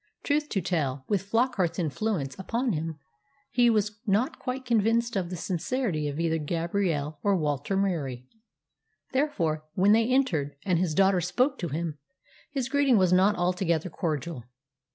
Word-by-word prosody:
Truth 295 0 0
to 195 - 0
tell, 140 -7 -1
with 200 -3 +1
Flockart's 225 -6 +1
influence 165 -3 -1
upon 235 +4 -1
him, 160 0 -3 0.5
he 245 -1 +4
was 210 -2 0
not 215 +9 +1
quite 260 0 -4
convinced 235 0 +2
of 185 -3 -1
the 180 - -4
sincerity 175 - -1
of 145 +2 -4
either 165 -1 +1
Gabrielle 165 -2 -1
or 200 -2 +2
Walter 150 +3 -1
Murie. 145 -11 -1 0.9
Therefore, 175 - 0
when 195 +3 +4
they 225 +1 +4
entered, 170 - +1
and 180 -4 +2
his 170 -4 0
daughter 195 -2 +4
spoke 255 - +1
to 175 - -2
him; 155 0 -3 0.5
his 270 -4 -2
greeting 280 -3 +3
was 185 -2 +4
not 195 +3 +4
altogether 175 -1 0
cordial. 155 -6 -3
185 Hz, 155 wpm, -27 LUFS, 160-230 Hz, 0.9 s, he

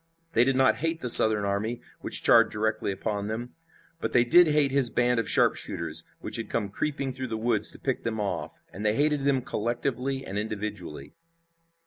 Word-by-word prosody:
They 115 - +4
did 135 +1 0
not 130 0 +2
hate 165 +1 -3
the 125 - +3
Southern 110 -2 +8
army 105 +4 -3 0.2
which - - -3
charged - - +5
directly 110 -1 -2
upon 100 +1 -4
them, 115 +3 -6 0.5
but - - -4
they 120 - +4
did 175 +8 +5
hate 150 -2 +1
this 135 -3 +3
band 120 0 0
of 115 - -1
sharpshooters - - 0 0.2
which - - +1
had 115 - -6
come 105 -4 -3
creeping 140 +4 -4
through 130 0 -6
the 110 -2 -5
woods 110 -2 +2
to - - -7
pick 130 -2 -3
them 110 -1 -4
off, 100 -2 -5
and 100 - -8
they 105 0 0
hated 145 +1 0
them 135 -3 +1
collectively 130 +2 -3
and 100 +2 -4
individually. 105 -9 -7
115 Hz, 190 wpm, -26 LUFS, 105-135 Hz, 0.5 s, Southern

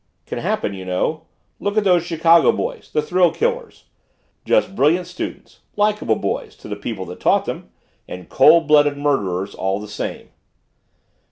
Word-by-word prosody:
Can - - -5
happen 100 - -2
you 95 -1 -7
know 125 - -2 0.3
look 205 +1 -2
at 215 - +3
those 180 -3 +4
Chicago 165 0 +4
boys - - -5
the 150 - 0
thrill 180 -1 +3
killers. 485 0 -3 0.6
Just 190 - +1
brilliant 170 +4 +2
students 180 +1 -8 0.2
likeable 210 - +1
boys - - -4
to - - -13
the 105 - -4
people 100 -1 -6
that 90 +1 -10
taught - - +2
them - - -6 0.4
and 90 -1 -9
cold 155 +3 +5
blooded 145 -1 +4
murderers 100 -10 -1
all 95 +1 -2
the 105 - -8
same." 105 - -6
150 Hz, 160 wpm, -20 LUFS, -, 0.6 s, cold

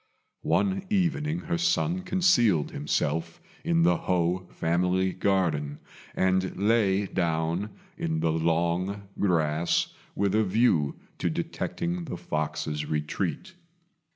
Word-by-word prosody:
One 195 -1 +2
evening 170 -4 0
her 170 0 -2
son 175 0 +1
concealed 175 - +3
himself 75 - -1 0.2
in 165 0 +2
the 170 - +4
Ho 90 0 0
family 90 +3 +1
garden, 80 -7 0 0.4
and 95 0 +1
lay 100 -1 +2
down 85 +2 -1 0.3
in 80 -1 -1
the 80 0 +1
long 85 +5 0 0.2
grass 80 -3 +1 0.2
with 100 -1 +1
a 110 +1 +4
view 95 -8 +2 0.2
to - - +1
detecting 170 +1 -3
the 125 - -5
fox's 75 -2 -3
retreat. 80 - -2
95 Hz, 110 wpm, -27 LUFS, -, 0.4 s, the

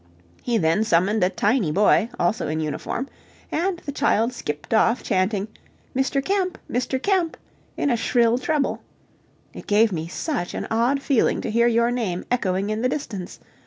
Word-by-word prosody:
He 240 -2 0
then 165 +2 +2
summoned 195 +2 +2
a 180 - +4
tiny 205 - +1
boy, 210 +5 +3
also 175 +6 0
in 155 +1 -2
uniform, 160 - -3 0.4
and 355 +3 0
the 285 - -3
child 250 -4 +1
skipped 150 -4 -5
off 225 +2 +3
chanting, 195 0 0 0.5
"Mister 265 +1 +1
Kemp! 375 +2 -1
Mister 250 +2 -1
Kemp!" 360 +2 0 0.4
in 285 - +1
a - - +3
shrill 235 +1 +2
treble. 295 +2 -1 0.7
It - - -10
gave 215 +1 +4
me 165 -2 -3
such 180 - -3
an - - -3
odd 245 +5 +1
feeling 270 -5 +2
to 225 - -3
hear 235 +2 +3
your 235 0 +2
name 210 -8 -2
echoing 195 -4 0
in 215 +1 -2
the 255 - +2
distance. 215 -11 -5
230 Hz, 165 wpm, -23 LUFS, 195-265 Hz, 0.7 s, a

